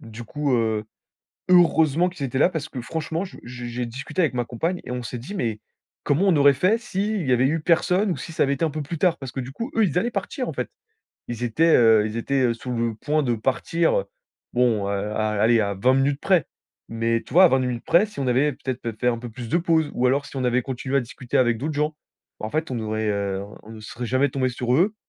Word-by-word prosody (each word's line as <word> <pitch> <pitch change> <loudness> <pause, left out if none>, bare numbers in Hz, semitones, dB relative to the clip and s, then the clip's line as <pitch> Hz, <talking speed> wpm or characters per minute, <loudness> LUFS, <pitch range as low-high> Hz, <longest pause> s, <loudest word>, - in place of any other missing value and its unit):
Du 115 +1 -9
coup, 145 +2 -1
heu, 110 -2 0 0.7
heureusement 170 -2 +4
qu'ils 175 -6 -4
étaient 130 0 -3
là - - +6
parce 160 -4 -4
que 130 - -6
franchement 160 +7 -3
je 190 - -12
j 120 0 -8
j - - -5
j'ai 120 +1 -3
discuté 135 +9 -4
avec 145 -7 +1
ma 120 -1 -1
compagne 165 +10 -2
et - - -6
on 125 -1 -3
s'est 120 +2 -5
dit: 150 - -8
«Mais 115 - -2 0.4
comment 145 +7 +1
on 170 - +4
aurait 140 0 +6
fait 185 - +2
si 215 -2 -2
il 170 -9 -2
y 125 - +4
avait 125 +2 +3
eu 160 +3 0
personne 180 +5 +2
ou - - -2
si 165 - -7
ça - - +1
avait 140 0 +1
été 140 - -3
un 160 - +2
peu 150 +1 -4
plus 165 +3 -5
tard?». 175 0 +2
Parce 135 -3 -8
que 130 - -3
du 125 - -7
coup, 230 - -5
eux, 225 - +4
ils 175 -3 +1
allaient 240 - -1
partir 235 +5 -3
en - - -4
fait. 125 -2 -3 0.6
Ils 120 0 -5
étaient 160 +8 +3
heu, 110 -3 +5
ils 110 - -6
étaient 130 -1 +1
sous 125 +2 -7
le 115 -1 -1
point 150 +6 0
de 120 -2 +1
partir, 135 +8 0
heu, 100 - -5 0.5
bon, 115 -5 +2
heu, - - -1
à 105 +2 -1
allez, 115 +1 +4
à 100 0 -1
20 125 +7 +3
minutes 140 +1 +1
près. 185 -6 +3 0.4
Mais 115 0 0
tu - - -12
vois, 185 +1 +8
20 130 - +3
minutes 125 -2 -2
près, 175 +5 +4
si 210 -9 -10
on 130 - -1
avait 135 +4 +2
peut-être 130 -2 -5
pé 115 -2 -4
fait 125 - 0
un 115 -1 +1
peu 120 0 -7
plus 115 0 -8
de 170 - +2
pause 165 -3 +1
ou 125 +1 +2
alors 140 +2 +1
si - - -12
on 130 - -1
avait 125 +1 +2
continué 130 +1 -4
à - - +2
discuter 120 +1 -4
avec 120 -3 +3
d'autres 150 +5 -3
gens. 150 +1 0 0.4
Bah - - -4
en - - -6
fait 155 -2 -2
on 120 - -2
aurait 110 0 -2
heu, 100 -1 -2 0.2
on 110 - -12
ne 110 - -10
serait 120 +3 -6
jamais 130 +4 +2
tombés 130 -1 0
sur 125 0 -1
eux 200 +8 +2
130 Hz, 270 wpm, -23 LUFS, 120-160 Hz, 0.7 s, vois